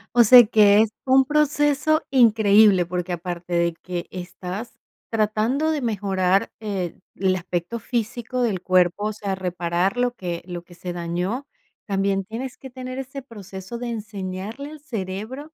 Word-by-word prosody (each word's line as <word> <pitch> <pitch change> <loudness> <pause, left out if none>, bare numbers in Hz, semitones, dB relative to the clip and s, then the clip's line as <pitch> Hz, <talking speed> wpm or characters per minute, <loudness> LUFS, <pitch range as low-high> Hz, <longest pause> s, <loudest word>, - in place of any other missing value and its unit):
O 240 -1 +7
sea, 245 +3 +10
que 210 -1 +6
es 220 - +2 0.2
un 265 0 +5
proceso 295 +1 +2
increíble, 215 -6 +5
porque 180 +1 -3
aparte 175 0 -5
de 170 0 +2
que 180 -1 -5
estás 180 +5 -7 0.3
tratando 225 +8 +1
de 305 -2 -1
mejorar, 195 -4 +1
eh, 195 -5 -4 0.2
el 190 0 +1
aspecto 180 +5 -3
físico, 240 +2 -3
del 210 -7 0
cuerpo, 185 +2 +2
o 215 - -2
sea, 200 -2 -3
reparar 180 +1 -1
lo 245 0 +1
que 175 -7 -5
lo 175 -1 -6
que 175 0 -16
se 180 +1 -6
dañó, 175 +10 -3 0.4
también 195 -1 0
tienes 245 +5 -6
que 265 - -10
tener 255 +1 -7
ese 270 +1 -6
proceso 200 -3 -9
de 245 +1 -5
enseñarle 210 +4 -5
al 310 -2 -11
cerebro 230 +4 -6
205 Hz, 155 wpm, -23 LUFS, 185-245 Hz, 0.4 s, sea